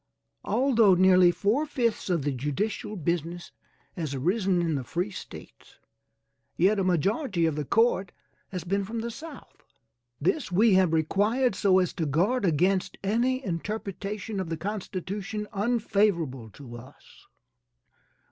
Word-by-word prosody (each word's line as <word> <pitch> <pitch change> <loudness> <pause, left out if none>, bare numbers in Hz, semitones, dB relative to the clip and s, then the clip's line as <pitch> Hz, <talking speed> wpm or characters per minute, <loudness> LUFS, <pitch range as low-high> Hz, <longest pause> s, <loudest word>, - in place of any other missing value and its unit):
Although 230 -7 +4
nearly 185 0 +6
four 215 - 0
fifths 235 -8 -1
of 170 -5 +1
the 145 - 0
judicial 150 - -3
business 170 0 -3 0.4
has 155 -5 -3
arisen 185 - +1
in 170 -2 0
the 140 -3 -2
free 175 +10 -3
States, - - -11 0.8
yet 200 +3 +3
a - - +1
majority 185 - +1
of 160 -2 0
the 150 -1 -3
court 225 - +2 0.4
has 180 -4 -5
been 195 +3 -1
from 225 +3 -4
the 235 +1 -4
South. 310 +3 -11 0.6
This 210 - 0
we 210 +4 +4
have 185 -3 +4
required 205 - +1
so 190 -1 +3
as 185 -1 +1
to 160 - -2
guard 195 - +1
against 180 +3 +1
any 245 +6 0
interpretation 200 +3 -4
of 185 -3 -3
the 165 - -3
constitution 205 +2 -4
unfavorable 200 - 0
to 120 0 -11
us. 120 +2 -16
190 Hz, 140 wpm, -27 LUFS, 170-215 Hz, 0.8 s, nearly